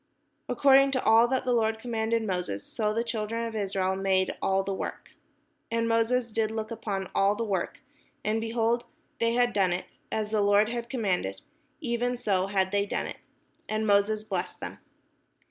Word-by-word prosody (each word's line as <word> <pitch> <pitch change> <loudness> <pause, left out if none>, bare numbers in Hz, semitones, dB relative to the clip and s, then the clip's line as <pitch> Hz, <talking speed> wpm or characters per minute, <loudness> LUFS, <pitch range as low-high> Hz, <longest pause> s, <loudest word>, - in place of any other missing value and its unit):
According 275 0 +5
to 260 - 0
all 225 +2 +6
that 260 +1 -1
the 250 - +2
Lord 220 -1 +2
commanded 225 -1 -1
Moses, 180 - -2
so 210 -2 -1
the 230 +2 0
children 230 0 -2
of 225 -1 -5
Israel 190 -2 0
made 190 -1 +1
all 195 0 +2
the 195 - -2
work. - - -5 0.6
And 230 0 0
Moses 230 +1 +1
did 220 0 +1
look 220 0 -4
upon 200 -4 -4
all 200 +1 +3
the 230 - -2
work, 195 -5 -2 0.4
and, 220 +1 +1
behold, 230 +1 +1 0.4
they 230 0 +2
had 245 0 +2
done 195 -3 +3
it 180 - -3 0.3
as 215 -1 -2
the 215 -1 +2
Lord 205 +1 +4
had 235 0 -4
commanded, 190 - -1 0.4
even 245 -2 -1
so 195 -6 +1
had 190 -1 +1
they 200 0 +1
done - - -2
it: - - -6 0.5
and 215 0 0
Moses 210 +1 +3
blessed 190 -4 -3
them. - - -7
220 Hz, 180 wpm, -28 LUFS, 195-230 Hz, 0.6 s, all